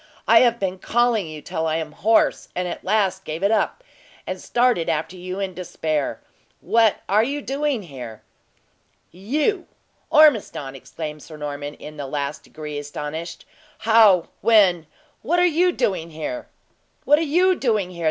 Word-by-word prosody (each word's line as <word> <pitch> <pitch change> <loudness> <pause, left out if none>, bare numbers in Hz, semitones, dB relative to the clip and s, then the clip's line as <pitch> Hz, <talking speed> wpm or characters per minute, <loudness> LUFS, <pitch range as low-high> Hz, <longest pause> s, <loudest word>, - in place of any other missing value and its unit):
"I 230 - +7
have 235 -1 +3
been 190 -1 -2
calling 235 -5 +1
you 155 -1 -9
till 160 0 -2
I 155 - 0
am 160 -1 -3
hoarse, 220 +9 +2
and 180 0 -1
at - - -6
last 190 -1 +1
gave 160 +2 -5
it 200 - +3
up, 225 - 0 0.4
and - - -5
started 240 -8 +1
after 160 +4 -2
you 185 +1 -6
in 195 -2 -3
despair. 160 -5 -3 0.4
What 220 +2 +2
are 205 +3 +4
you 280 +4 -2
doing 280 -4 -2
here?" 125 - -9 0.9
"You, 295 - -1 0.4
Ormiston!" 230 - +4
exclaimed 150 +3 -7
Sir 155 +1 -11
Norman, 145 0 -5
in 150 0 -11
the 140 -2 -5
last 140 +1 -3
degree 150 -1 -7
astonished. 150 +3 -6 0.3
"How 215 -6 +5
when 190 -8 +4 0.3
what 325 +10 0
are 355 - +4
you 355 +2 +3
doing 180 - -1
here?" 165 - -5 0.6
"What 295 +1 +5
are - - -1 0.2
you 370 +1 +5
doing 215 - 0
here? 175 - -11
185 Hz, 160 wpm, -22 LUFS, 155-230 Hz, 0.9 s, I